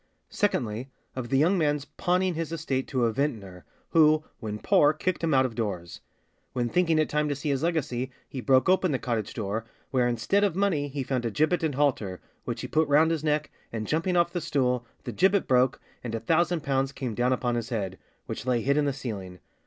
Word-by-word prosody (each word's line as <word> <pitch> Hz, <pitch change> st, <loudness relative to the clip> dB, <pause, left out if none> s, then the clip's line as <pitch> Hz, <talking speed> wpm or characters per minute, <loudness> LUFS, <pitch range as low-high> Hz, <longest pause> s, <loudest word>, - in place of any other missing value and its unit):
Secondly, 125 Hz, -, -1 dB, 0.3 s
of 125 Hz, -2 st, -4 dB
the 135 Hz, -, +2 dB
young 175 Hz, +7 st, +3 dB
man's 145 Hz, -2 st, +1 dB
pawning 180 Hz, +3 st, 0 dB
his 165 Hz, -1 st, -3 dB
estate 145 Hz, -5 st, -2 dB
to 130 Hz, -3 st, +1 dB
a 115 Hz, -, +1 dB
vintner, 105 Hz, -9 st, -3 dB, 0.3 s
who, 155 Hz, -2 st, +5 dB, 0.2 s
when 105 Hz, -2 st, -4 dB
poor, 145 Hz, +7 st, +4 dB
kicked 175 Hz, +3 st, -2 dB
him 165 Hz, -, +1 dB
out 130 Hz, -2 st, +4 dB
of 125 Hz, -, -3 dB
doors; 100 Hz, -7 st, -4 dB, 0.5 s
when 120 Hz, -2 st, -1 dB
thinking 165 Hz, 0 st, +2 dB
it 155 Hz, -, +3 dB
time 150 Hz, 0 st, 0 dB
to 145 Hz, -, 0 dB
see 145 Hz, +2 st, -3 dB
his 135 Hz, -1 st, 0 dB
legacy, 145 Hz, -7 st, -1 dB, 0.2 s
he 130 Hz, -, -6 dB
broke 130 Hz, 0 st, +4 dB
open 185 Hz, -1 st, +3 dB
the 135 Hz, -, +1 dB
cottage 115 Hz, -5 st, -2 dB
door, 110 Hz, 0 st, -2 dB, 0.3 s
where 125 Hz, -2 st, +2 dB
instead 120 Hz, -, +1 dB
of 195 Hz, -5 st, +1 dB
money 185 Hz, -7 st, +1 dB
he 140 Hz, -1 st, -4 dB
found 130 Hz, -1 st, -1 dB
a 115 Hz, -, 0 dB
gibbet 155 Hz, -, +1 dB
and 155 Hz, -4 st, -1 dB
halter, 120 Hz, -10 st, 0 dB, 0.3 s
which -, -, -3 dB
he -, -, -4 dB
put 160 Hz, 0 st, +2 dB
round 155 Hz, +3 st, +4 dB
his 160 Hz, -2 st, -1 dB
neck, 150 Hz, 0 st, 0 dB, 0.2 s
and 110 Hz, -2 st, -3 dB
jumping 165 Hz, -, 0 dB
off 170 Hz, 0 st, +2 dB
the 175 Hz, -, -1 dB
stool, 125 Hz, -6 st, 0 dB, 0.2 s
the -, -, -4 dB
gibbet 195 Hz, +1 st, +2 dB
broke, 125 Hz, 0 st, +3 dB, 0.2 s
and 115 Hz, -2 st, -3 dB
a -, -, -2 dB
thousand 170 Hz, +2 st, +1 dB
pounds 135 Hz, 0 st, 0 dB
came 130 Hz, -4 st, -4 dB
down 120 Hz, +3 st, +1 dB
upon 125 Hz, -1 st, 0 dB
his 120 Hz, 0 st, -2 dB
head, 95 Hz, -6 st, -3 dB, 0.3 s
which -, -, -6 dB
lay 120 Hz, -2 st, +2 dB
hid 140 Hz, +4 st, +2 dB
in 150 Hz, -, +3 dB
the 140 Hz, -, 0 dB
ceiling. 100 Hz, -9 st, -6 dB
140 Hz, 220 wpm, -27 LUFS, 120-160 Hz, 0.5 s, who